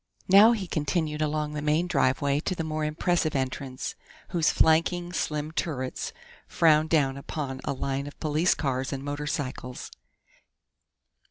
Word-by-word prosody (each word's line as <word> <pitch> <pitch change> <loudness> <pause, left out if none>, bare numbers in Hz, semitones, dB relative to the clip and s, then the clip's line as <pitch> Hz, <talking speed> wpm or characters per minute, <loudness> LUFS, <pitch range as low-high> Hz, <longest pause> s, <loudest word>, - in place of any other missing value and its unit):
Now 205 +5 +8
he 210 -5 -3
continued 155 -1 -1
along 150 0 -1
the 150 - -3
main 155 +3 +2
driveway 140 -3 +1
to 185 +4 -2
the 165 - -3
more 155 -1 -2
impressive 155 +1 0
entrance, 130 0 -3 0.4
whose 165 -3 +2
flanking, 175 +2 +2
slim 150 -2 -2
turrets 130 -6 -3 0.4
frowned 155 -1 +4
down 140 -4 +2
upon 140 -2 -5
a 140 - -1
line 135 +1 -3
of 145 - -11
police 155 +3 +2
cars 135 -2 -2
and 135 -1 -4
motorcycles. 145 -3 -4
150 Hz, 140 wpm, -27 LUFS, 140-160 Hz, 0.4 s, Now